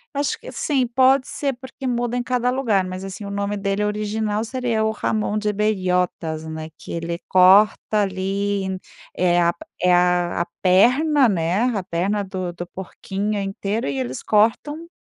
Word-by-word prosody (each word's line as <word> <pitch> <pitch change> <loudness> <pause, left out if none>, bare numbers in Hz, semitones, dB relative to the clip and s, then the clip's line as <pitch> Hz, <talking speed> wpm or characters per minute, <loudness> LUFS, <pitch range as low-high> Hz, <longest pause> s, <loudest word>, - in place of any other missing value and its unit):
Acho 285 0 -1
que - - -9
sim, 265 -5 0
pode 260 +2 +3
ser 280 -2 -2
porque 260 +1 -10
muda 245 -1 -1
em 245 - -1
cada 250 0 0
lugar, 235 -7 +1
mas, 185 +1 -6
assim, 195 +2 -7
o - - -6
nome 200 0 -2
dele 200 +1 -1
original 210 +1 -1
seria 235 -2 -1
o 220 - +1
jamón 215 -1 -1
de 210 0 -1
Bellotas. 180 -6 -1
né 160 0 -6
que - - -10
ele 170 0 -3
corta 200 +3 +5
ali, 195 +1 -1 0.5
é 175 -1 +2
a 170 0 +3 0.3
é 180 0 +4
a 175 -1 +2 0.2
perna, 250 +9 +4
né, 180 +2 0 0.2
a 190 - -3
perna 190 +4 -1
do 185 -2 -4
do 175 +1 -6
porquinho 195 +3 -4
inteiro 200 +1 -3
e 135 -1 -2
eles 130 0 -4
cortam, 230 +10 +1
205 Hz, 165 wpm, -22 LUFS, 185-230 Hz, 0.5 s, corta